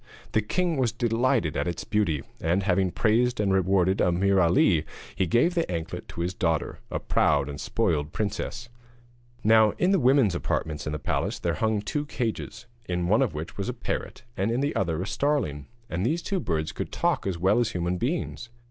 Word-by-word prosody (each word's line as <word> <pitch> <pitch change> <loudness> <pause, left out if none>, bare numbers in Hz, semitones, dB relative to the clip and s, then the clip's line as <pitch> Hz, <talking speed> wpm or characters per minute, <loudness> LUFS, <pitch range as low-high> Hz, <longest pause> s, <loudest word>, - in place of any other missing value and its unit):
The 110 - +2
king 170 - 0
was 125 -4 +2
delighted 115 - +1
at - - -1
its 85 - -3
beauty, 105 -10 0 0.2
and 90 +4 +1
having 95 -1 +2
praised 120 +6 +2
and 100 -2 +2
rewarded 95 0 +2
Ameer 95 +2 +3
Ali, 85 -1 +4 0.3
he 95 - +1
gave 125 - +3
the 170 -2 0
anklet 80 -2 -4
to 85 - -6
his 90 +2 -1
daughter, 80 -4 -1
a - - -2
proud 70 -2 +2
and 70 0 -6
spoiled 75 -1 0
princess. 110 +3 -3 0.8
Now 110 -1 +5
in 180 - +2
the 195 - +4
women's 130 - +4
apartments 75 -3 -2
in 75 - -2
the - - -1
palace 75 - -2
there 85 - -1
hung 110 +3 0
two 145 +6 -2
cages, 110 -3 -4 0.2
in 90 -1 -1
one 110 +5 +4
of 125 - 0
which 80 +2 -6
was 100 +2 -2
a - - -2
parrot 120 - -4
and 95 +3 0
in 120 +3 0
the 145 +1 -1
other 85 -2 0
a - - -4
starling, 115 - -1 0.2
and 90 +2 -2
these 165 +9 0
two 195 -2 -1
birds 80 - -2
could - - -5
talk - - 0
as 95 -3 -1
well 95 +7 +3
as 120 - 0
human 90 0 -1
beings. 125 -3 -2
100 Hz, 200 wpm, -26 LUFS, 85-120 Hz, 0.8 s, Now